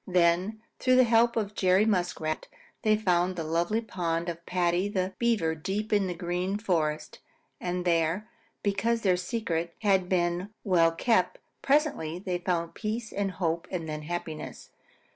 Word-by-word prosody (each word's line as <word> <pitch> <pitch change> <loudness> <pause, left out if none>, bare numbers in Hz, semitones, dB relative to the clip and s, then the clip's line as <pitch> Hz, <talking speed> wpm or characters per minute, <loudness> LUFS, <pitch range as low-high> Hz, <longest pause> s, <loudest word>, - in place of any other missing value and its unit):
Then, 180 +4 +2 0.2
through 255 0 +4
the 255 - +7
help 235 0 +4
of 215 -2 -1
Jerry 190 +1 +3
Muskrat, 175 -6 -1 0.3
they 215 -1 +3
found 180 -3 +1
the 165 - -3
lonely 170 +8 0
pond 170 -5 -2
of 170 0 -6
Paddy 180 +2 +1
the 190 -2 -1
Beaver 225 -9 +2
deep 200 +7 -3
in 200 -2 +3
the 180 - -3
Green 180 +3 -2
Forest, 160 -7 -1 0.4
and 180 0 -2
there, 170 +4 +1 0.4
because 220 +3 +1
their 185 -4 +3
secret 180 -4 -2
had 190 -3 +3
been 175 +1 0
well 170 -4 +4
kept, 230 - +1 0.2
presently 275 - +1
they 180 -1 -3
found 170 -2 -1
peace 220 +1 -4
and 195 -2 -1
hope 170 0 -1
and 170 -4 -4
then 155 -1 -4
happiness. 160 -1 -6
180 Hz, 155 wpm, -28 LUFS, 170-210 Hz, 0.4 s, the